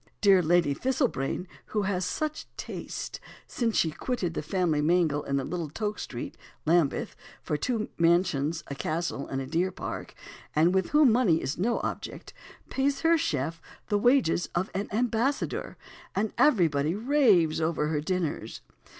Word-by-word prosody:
Dear 195 -3 +6
Lady 170 -3 +3
Thistlebrain, 240 - -1 0.2
who 210 -1 -1
has 190 -2 0
such 310 +10 -3
taste - - -6 0.3
(since 230 -3 -1
she 160 - +3
quitted 185 -2 -2
the - - -2
family 160 -1 0
mangle 160 -2 +2
in 140 -1 -1
Little 160 +4 -3
Toke 210 +6 -3
Street, 120 - -6 0.3
Lambeth, 160 -3 +2 0.3
for - - -1
two 220 +7 -1
mansions, 165 -2 +2
a - - -6
castle, 155 0 -3
and 135 - -3
a 135 - -3
deer 170 +7 0
park), - - -6 0.4
and 165 +4 +4
with 190 -1 +1
whom 295 -4 +5
money 220 -9 +3
is 145 +2 -3
no 230 +5 +1
object, - - -5 0.4
pays 275 +1 0
her 330 +1 +5
chef 160 - -1 0.3
the 205 -1 +2
wages 240 -7 +3
of 180 +3 -1
an 200 +2 -2
ambassador, 240 +5 -1 0.4
and 210 +2 0
everybody 165 - +3
raves 210 - +3
over 160 -2 0
her 150 -2 0
dinners. 180 -1 -3
175 Hz, 150 wpm, -28 LUFS, 155-220 Hz, 0.4 s, Dear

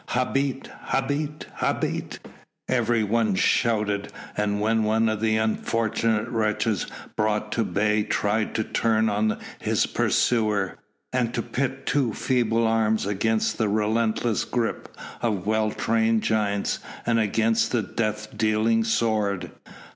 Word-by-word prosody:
"Habet! 135 +1 0 0.2
Habet! 145 +3 -1
Habet!" - - -1 0.5
everyone 115 -3 +1
shouted 105 -2 +1 0.2
when 105 +2 +1
one 110 +1 +2
of 110 -1 -1
the 110 -1 +2
unfortunate 110 0 0
wretches 110 -2 0 0.3
brought 105 0 0
to 115 - +1
bay 105 +1 +1
tried 105 +1 0
to 110 - +1
turn 110 0 +1
on 105 +1 +1 0.2
his - - +1
pursuer, 105 -6 +1 0.3
and 125 -2 0
to - - -1
pit 135 0 -3
two 135 -5 +1
feeble 115 -3 +1
arms 110 -1 +2
against 110 +4 0
the 110 -2 +2
relentless 110 +1 +1
grip 120 -2 -2 0.3
of 105 -6 -1
well 110 0 +1
trained 115 0 +1
giants, 105 -2 0 0.3
and 115 -1 +2
against 110 +1 +2
the 120 -3 +1
death 105 +1 -3
dealing 110 +1 +2
sword. 110 -4 0
110 Hz, 120 wpm, -25 LUFS, 105-115 Hz, 0.5 s, one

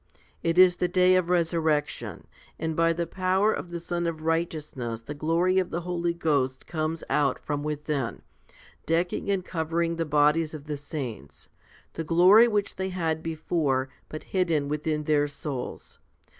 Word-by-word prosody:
It 165 +1 0
is 180 -1 +7
the 180 - +1
day 180 +1 +4
of 185 -2 +2
resurrection; 160 -4 0 0.3
and 160 0 -2
by 165 +1 +3
the 170 +1 -1
power 190 +4 +1
of 175 - -5
the 170 0 -5
Sun 175 0 -2
of 160 -2 -4
Righteousness 155 -8 -2
the 130 +6 -7
glory 170 +5 +2
of 185 - -1
the 170 - -3
Holy 175 -1 -2
Ghost 140 -6 0
comes 160 0 -3
out 145 -2 +2
from 145 -1 -3
within, 150 -4 -3 0.6
decking 170 +4 0
and 195 -2 0
covering 165 0 -1
the 165 - 0
bodies 150 +2 +2
of 145 -2 -9
the 150 -1 -3
saints 130 - -7 0.4
the 165 - -4
glory 180 +8 +6
which 205 -3 -1
they 190 0 -2
had 165 -4 -1
before, 155 -5 -1 0.2
but 155 - -7
hidden 165 -6 +1
within 150 +1 -1
in - - -7
their 150 -1 +2
souls. 145 -3 -6
165 Hz, 165 wpm, -27 LUFS, 150-175 Hz, 0.6 s, is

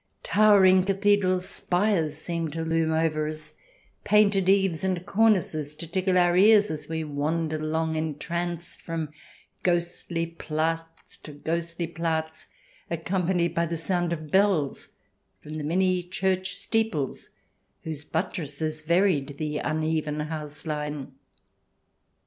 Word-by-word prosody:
Towering 195 -3 +5
cathedral 195 -1 +2
spires 180 -4 0
seemed 165 -1 -3
to 165 0 -3
loom 160 0 +1
over 160 -1 +1
us, 155 0 -4 0.5
painted 200 -3 +4
eaves 190 -4 +3
and 185 -2 -1
cornices 185 -9 +2
to 160 - -7
tickle 185 +2 +1
our 175 -1 +4
ears 210 +1 +6
as 155 0 -5
we 160 0 -2
wandered 155 +2 -2
along, 160 +1 -1
entranced, 170 +3 -3
from 165 -2 -4 0.5
ghostly 175 -1 -1
Platz 165 0 -4
to 150 - -11
ghostly 170 +3 -3
Platz, 160 -1 -3 0.4
accompanied 170 0 0
by 170 0 +1
the 165 +1 -3
sound 175 +1 -1
of 155 -3 -5
bells 190 -8 +2 0.5
from 155 +1 -6
the - - -4
many 185 +3 +2
church 185 +1 -1
steeples 220 - -1 0.5
whose 155 -2 -5
but 160 +5 -2
tresses 155 0 -4
varied 155 -4 +1
the 150 -1 -2
uneven 155 0 -1
house 150 -1 -5
line. 150 -3 -4
165 Hz, 125 wpm, -26 LUFS, 155-185 Hz, 0.5 s, ears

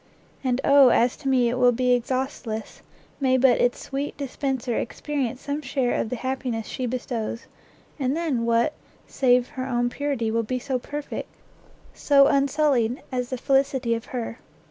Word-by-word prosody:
And 255 -1 +1
oh 280 -2 +7
as 240 +1 +3
to 290 - -7
me 255 -2 +3
it 245 +2 -1
will 250 -1 +6
be 250 +1 +1
exhaustless, 245 -2 -3 0.4
may 260 -2 +3
but 255 -1 +4
its 245 0 +2
sweet 280 +1 -4
dispenser 265 -3 -2
experience 265 -1 -3
some 285 +1 -3
share 260 -3 -1
of - - -1
the 250 - -2
happiness 255 -3 -3
she 255 +3 -4
bestows, 235 -2 -4 0.5
and 270 +2 0
then 300 -9 -1
what, 235 +6 +2 0.3
save 250 -2 +2
her 260 0 -5
own 245 -1 0
purity, 275 -6 -1
will 230 +1 +1
be 240 +3 -2
so 255 0 -2
perfect, 290 +3 -6 0.6
so 280 -1 +5
unsullied, 275 -4 +2
as 250 -1 -2
the 255 - -3
felicity 270 -2 +1
of 230 0 -3
her! 235 -2 -5
255 Hz, 165 wpm, -24 LUFS, 240-275 Hz, 0.6 s, oh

